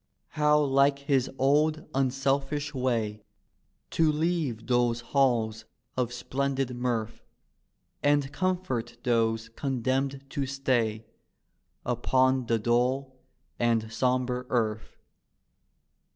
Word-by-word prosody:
How 150 0 +3
like 140 -1 +3
his 140 -2 +1
old 150 +3 +2
unselfish 135 +2 0
way 115 -5 -1 0.7
To 160 -1 +3
leave 150 -8 -1
those 120 -1 +1
halls 115 -4 +1 0.3
of 125 -2 -1
splendid 135 +1 -2
mirth 120 -3 -2 0.8
And 145 -1 +2
comfort 175 -10 -2
those 115 -2 +1
condemned 135 +2 -2
to 140 -2 -2
stay 120 -5 0 0.8
Upon 130 -1 +2
the 115 - +2
dull 125 +4 0 0.4
and 115 -1 +1
sombre 125 0 0
earth. 110 -3 -1
130 Hz, 95 wpm, -28 LUFS, 120-140 Hz, 0.8 s, How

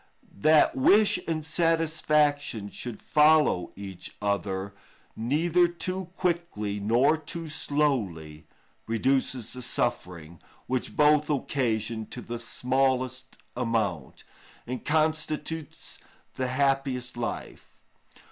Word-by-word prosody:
That 155 +7 +5
wish 200 +9 +4
and 155 -2 -2
satisfaction 150 - +1
should 120 -3 -7
follow 150 - +4
each 95 -2 -8
other 100 -1 -2 0.4
neither 165 +9 +2
too 185 +2 -4
quickly 170 - -1
nor 120 +9 +3
too 165 +2 -7
slowly 120 - -1 0.4
reduces 125 +1 0
the 125 - -6
suffering, 85 -8 -3 0.2
which 130 -1 -3
both 150 0 +4
occasion 115 -6 -1
to 125 - -8
the 120 0 -5
smallest 130 +2 -1 0.2
amount, 110 - -2 0.4
and 125 +1 -5
constitutes 155 0 -2 0.3
the 130 - -2
happiest 135 -1 0
life. 120 -1 -6
130 Hz, 95 wpm, -27 LUFS, 110-155 Hz, 0.4 s, That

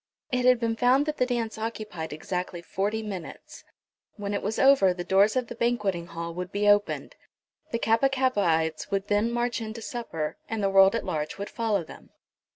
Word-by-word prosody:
It 250 0 +1
had 250 -1 +5
been 230 -1 0
found 255 +5 +3
that 305 0 -3
the 250 - +2
dance 230 -3 -2
occupied 215 -7 -5
exactly 175 +3 -4
forty 205 +5 -2
minutes. 190 -6 -8 0.5
When 205 -1 -4
it 200 - -1
was 210 +2 -2
over 265 -10 +5
the 175 - -4
doors 195 +5 +3
of 255 -1 +1
the 235 - -8
banquetting 210 -8 -1
hall 170 -1 -6
would 180 +2 -5
be 205 +1 0
opened. 205 0 +2 0.5
The 230 - -1
Kappa 230 +4 +3
kappaites 185 -12 +1
would 195 0 -2
then 205 +2 +2
march 240 0 -1
into 220 +1 -6
supper, 165 -12 -4
and 225 -2 -2
the 195 - +2
world 195 +2 +6
at 230 - -2
large 150 -1 -3
would 200 0 -6
follow 215 -5 0
them. - - -13
210 Hz, 190 wpm, -27 LUFS, 185-235 Hz, 0.5 s, world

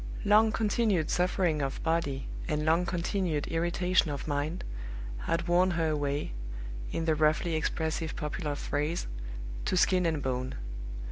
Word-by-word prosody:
Long 215 +2 +6
continued 210 -6 +2
suffering 180 -3 +2
of 135 -1 -2
body 160 -5 0 0.2
and 150 -2 0
long 165 +3 +3
continued 175 -3 0
irritation 175 +1 +2
of 145 0 -4
mind 150 +4 -1 0.6
had 165 +1 0
worn 180 +2 +4
her 165 -1 +2
away 145 - -1 0.6
in 165 - -1
the 160 - +3
roughly 155 +2 +2
expressive 160 0 -1
popular 150 -1 -2
phrase 150 +4 -1 0.6
to 185 - +1
skin 180 -1 +4
and 155 -4 -1
bone. 130 0 -2
165 Hz, 135 wpm, -30 LUFS, 150-180 Hz, 0.6 s, Long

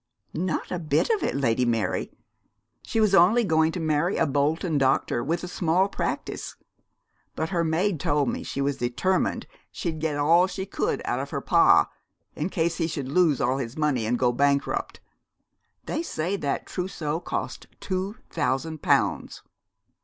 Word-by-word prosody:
'Not 175 +1 -2
a 180 - -2
bit 165 - +1
of 435 - +1
it, - - -1
Lady 125 -3 +1
Mary. 115 -5 0 0.7
She 225 - -2
was 215 -3 +3
only 195 +6 +6
going 160 -4 +2
to - - -3
marry 160 +3 +1
a 165 - +3
Bolton 150 +3 0
doctor 130 -3 +1
with 170 +4 -1
a - - -4
small 180 +1 +1
practice; - - -4 0.8
but 160 - -2
her 170 -3 0
maid 165 +2 0
told 145 -1 +1
me - - -2
she 140 - -4
was 140 0 0
determined 125 +11 0 0.3
she'd 160 -3 -4
get 155 -2 -1
all 165 +5 +4
she 190 0 -5
could - - -2
out - - -1
of - - -4
her - - -3
pa, - - +5 0.5
in 155 +5 -2
case 165 -2 0
he 165 - 0
should 140 -5 -4
lose 155 -3 +3
all 130 0 +1
his 120 0 -5
money 140 -8 +1
and 120 +2 +1
go 125 -1 +2
bankrupt. 140 +2 0 0.8
They 315 - -2
said 190 - -3
that 140 - -2
trousseau 165 -4 -3
cost - - -5
two 190 +2 -3 0.2
thousand 155 +1 -1
pounds.' - - +1
160 Hz, 170 wpm, -25 LUFS, 140-180 Hz, 0.8 s, only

